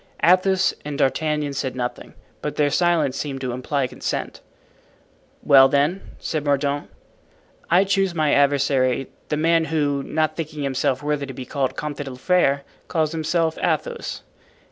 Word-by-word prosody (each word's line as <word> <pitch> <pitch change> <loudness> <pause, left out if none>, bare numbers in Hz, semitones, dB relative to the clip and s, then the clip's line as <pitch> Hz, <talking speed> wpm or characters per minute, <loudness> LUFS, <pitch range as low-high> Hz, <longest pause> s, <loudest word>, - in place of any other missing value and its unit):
Athos 185 +2 +4
and 145 -1 -5
D'Artagnan 150 +1 0
said 130 -2 -3
nothing, 125 -1 -5 0.3
but 150 - -4
their 145 -1 +2
silence 160 -4 +2
seemed 135 -1 -4
to 130 -2 -2
imply 130 +3 -1
consent. 125 - -4 1.0
"Well, 135 -1 +7
then," 150 +7 +1 0.2
said 155 -3 -3
Mordaunt, 145 0 0 0.8
"I 180 +3 +5
choose 195 0 +1
for - - -9
my 155 -2 +2
adversary 140 -2 +2 0.2
the 150 - 0
man 165 +1 +3
who, 145 -3 0
not 155 +2 -1
thinking 155 -2 -5
himself 135 0 0
worthy 145 -1 -1
to 135 - -8
be 130 - -6
called 135 -2 -2
Comte 150 -1 -4
de 145 -1 -5
la 130 - -8
Fere, 140 -2 +2 0.2
calls 160 -3 0
himself 165 0 0
Athos." 475 -1 -2
145 Hz, 155 wpm, -22 LUFS, 135-160 Hz, 1.0 s, Well